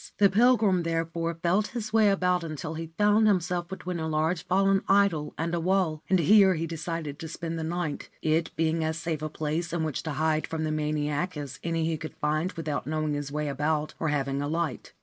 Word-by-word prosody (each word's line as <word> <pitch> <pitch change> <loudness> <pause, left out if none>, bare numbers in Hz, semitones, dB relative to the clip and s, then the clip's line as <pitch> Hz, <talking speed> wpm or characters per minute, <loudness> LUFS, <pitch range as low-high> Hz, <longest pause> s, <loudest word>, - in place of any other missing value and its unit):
The 200 -2 +5
pilgrim, 215 -4 +4
therefore, 165 0 -2
felt 190 +5 +2
his 215 -2 -5
way 220 -2 +5
about 180 -2 +1
until 155 0 -5
he 165 +1 -5
found 210 +1 +4
himself 180 -3 +1
between 180 -1 -5
a 160 - -2
large 160 +2 0
fallen 195 +1 +3
idol 195 -7 +3
and 165 +2 -2
a 170 - +1
wall; 175 -3 +1
and 190 - +5
here 190 +2 +6
he 165 +1 -2
decided 165 -2 -4
to 160 - -6
spend 165 0 -5
the - - -3
night, 165 -2 -3
it 160 +1 +1
being 165 0 +1
as 160 0 -1
safe 160 -2 -3
a 155 - -3
place 155 +2 -2
in 170 -1 -1
which 155 -4 -2
to 160 - -4
hide 155 +1 0
from 160 -1 -3
the 155 - -1
maniac 150 +2 -1
as 145 -4 -6
any 165 -1 0
he 160 -1 0
could 155 0 -8
find 155 +5 0
without 155 -4 -3
knowing 155 -1 -1
his 145 -1 -4
way 150 0 -2
about 150 +2 -1
or 160 - -1
having 140 -2 0
a 145 - -2
light. 160 -4 -3
165 Hz, 215 wpm, -27 LUFS, 155-180 Hz, -, here